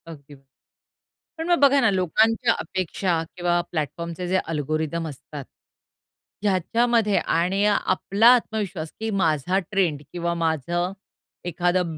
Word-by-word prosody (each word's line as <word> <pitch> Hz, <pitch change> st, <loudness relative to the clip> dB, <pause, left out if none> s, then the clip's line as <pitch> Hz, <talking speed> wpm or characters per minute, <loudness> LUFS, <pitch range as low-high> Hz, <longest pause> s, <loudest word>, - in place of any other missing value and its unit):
अगदी. 145 Hz, -3 st, -12 dB, 1.0 s
पण 325 Hz, +1 st, -4 dB
मग 345 Hz, -, +4 dB
बघा 280 Hz, 0 st, +5 dB
ना 230 Hz, -, +4 dB
लोकांच्या 220 Hz, +6 st, +2 dB
अपेक्षा 180 Hz, 0 st, -2 dB
किंवा 175 Hz, -1 st, +1 dB
प्लॅटफॉर्म 170 Hz, +2 st, -3 dB
चे 180 Hz, +2 st, -5 dB
जे 185 Hz, +1 st, +1 dB
अल्गोरिथम 155 Hz, 0 st, -2 dB
असतात. 145 Hz, -1 st, -9 dB, 1.0 s
ह्याच्यामध्ये 210 Hz, +3 st, +2 dB
आणि 185 Hz, +5 st, +1 dB
आपला 205 Hz, +1 st, +2 dB
आत्मविश्वास, 200 Hz, -9 st, -3 dB
की 220 Hz, 0 st, -3 dB
माझा 180 Hz, -3 st, +1 dB
ट्रेंड 175 Hz, -8 st, +1 dB
किंवा 170 Hz, -1 st, -2 dB
माझं 170 Hz, +3 st, -1 dB, 0.5 s
एखादं 175 Hz, -1 st, 0 dB
175 Hz, 115 wpm, -23 LUFS, 160-205 Hz, 1.0 s, बघा